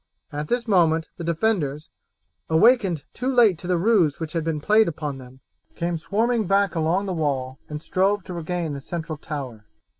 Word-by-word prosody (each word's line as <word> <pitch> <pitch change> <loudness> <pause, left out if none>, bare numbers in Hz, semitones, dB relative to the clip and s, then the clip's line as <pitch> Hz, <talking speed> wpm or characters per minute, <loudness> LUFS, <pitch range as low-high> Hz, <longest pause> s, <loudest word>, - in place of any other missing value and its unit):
At 150 +1 -4
this 240 +3 -1
moment 165 -5 +3
the 170 - -6
defenders, 165 -4 -1 0.6
awakened 185 - +4
too 255 +2 -2
late 225 -9 +4
to 175 - -6
the 180 -1 +2
ruse 180 -6 +3
which 160 -2 -5
had 165 -2 -1
been 160 -1 -1
played 215 +7 +4
upon 150 -4 -4
them, 130 +1 -14 0.3
came 170 0 -2
swarming 220 +6 0
back 200 +1 +2
along 170 +4 +1
the 190 - -2
wall 135 -5 -2
and 150 +1 -6
strove 195 +1 +1
to 180 - -7
regain 170 -2 -3
the 140 - -6
central 160 0 -5
tower. 130 -9 -7
170 Hz, 180 wpm, -24 LUFS, 150-200 Hz, 0.6 s, awakened